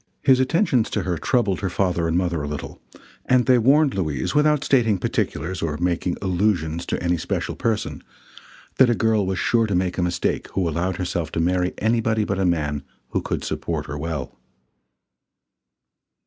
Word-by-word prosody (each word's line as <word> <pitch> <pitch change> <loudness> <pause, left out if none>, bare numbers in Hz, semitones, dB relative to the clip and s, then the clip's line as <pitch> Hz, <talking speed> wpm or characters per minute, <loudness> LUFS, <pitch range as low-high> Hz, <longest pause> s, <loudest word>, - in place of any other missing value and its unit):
His 130 -1 +5
attentions 130 - +2
to 105 - -1
her 90 -2 -1
troubled 105 -8 +1
her 95 - -2
father 90 -2 0
and 80 +1 +1
mother 85 -3 0
a 75 - -4
little, 75 -1 -6 0.4
and 125 -1 +3
they 125 -1 +5
warned 140 +4 +4
Louise, 75 -9 -2
without 150 -1 +3
stating 115 -7 +3
particulars 90 0 -2
or 75 -2 -2
making 90 +1 -1
allusions 85 -4 0
to - - -2
any 85 0 +1
special - - -3
person, 110 -2 -2 0.8
that 130 -2 +7
a 120 - +3
girl 110 -4 +1
was 95 -1 -1
sure 115 +1 +2
to 100 - -1
make 90 0 0
a - - +2
mistake 90 -1 -1
who 95 -3 0
allowed 85 +3 -1
herself 85 -3 -3
to - - -1
marry 90 +2 +1
anybody 110 -1 +1
but 100 -2 -2
a 95 - +2
man 75 -4 0 0.3
who - - -1
could - - -3
support - - -3
her 75 - -6
well. 75 -3 -4
95 Hz, 175 wpm, -23 LUFS, 85-115 Hz, 0.8 s, that